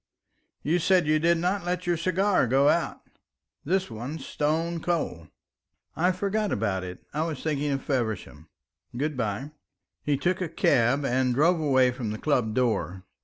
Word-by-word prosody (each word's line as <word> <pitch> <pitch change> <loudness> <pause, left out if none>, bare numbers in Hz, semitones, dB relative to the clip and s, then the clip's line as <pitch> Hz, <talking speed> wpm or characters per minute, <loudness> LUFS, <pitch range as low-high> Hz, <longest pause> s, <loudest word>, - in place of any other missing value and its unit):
"You 165 +5 +2
said 185 +1 +3
that 150 - -3
you 155 0 +4
did 170 +2 +3
not 180 +3 0
let 180 0 -2
your 175 0 +2
cigars 185 - +1
go 135 +3 +4
out. - - 0 0.6
This 185 -2 0
one's 130 +7 -6
stone 165 +3 -1
cold." 160 - -2 0.7
"I 180 +3 +2
forgot 200 +3 -1
about 100 -3 -1
it; 90 0 -9
I 150 - -1
was 160 -4 -3
thinking 150 -2 -1
of 135 -1 -2
Feversham. 110 - -3 0.5
Good 150 +3 -1
bye." 120 +4 -3 0.5
He 145 -2 0
took 180 +6 0
a 175 - -2
cab 135 +1 +2
and 125 -1 +1
drove 165 +5 +3
away 130 -4 +3
from 120 -3 -4
the 110 - -3
club 120 -6 0
door. 110 -7 0
145 Hz, 170 wpm, -26 LUFS, 125-170 Hz, 0.7 s, you